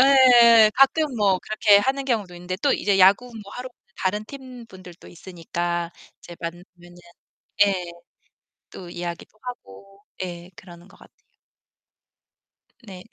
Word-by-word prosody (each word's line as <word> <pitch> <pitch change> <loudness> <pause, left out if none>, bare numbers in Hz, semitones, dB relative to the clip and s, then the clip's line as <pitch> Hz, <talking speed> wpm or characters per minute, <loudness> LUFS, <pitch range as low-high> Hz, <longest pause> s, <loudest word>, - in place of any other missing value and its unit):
예. 240 -5 +6
가끔 275 +1 +3
뭐 200 -4 +2
그렇게 210 -1 +3
하는 270 +5 -1
경우도 215 -9 -2
있는데 180 +1 -6
또 285 - +3
이제 200 -1 0
야구 195 +6 +5 0.2
뭐 200 - -14
하러 250 +1 -7
오는 215 - -43
다른 210 +3 -2
팀 255 -2 -12
분들도 185 -4 -15
있으니까 175 -1 -5 0.3
이제 175 - -13
만나면은 175 +1 -10 0.7
예 180 -3 -3 0.8
또 180 - -10
이야기도 175 +4 -8
하고. 195 - -11 0.2
예, 175 -1 -7
그러는 175 0 -15
것 195 - -20
같아요. - - -20 1.7
네. 185 -3 -11
195 Hz, 265 characters per minute, -22 LUFS, 175-240 Hz, 1.7 s, 예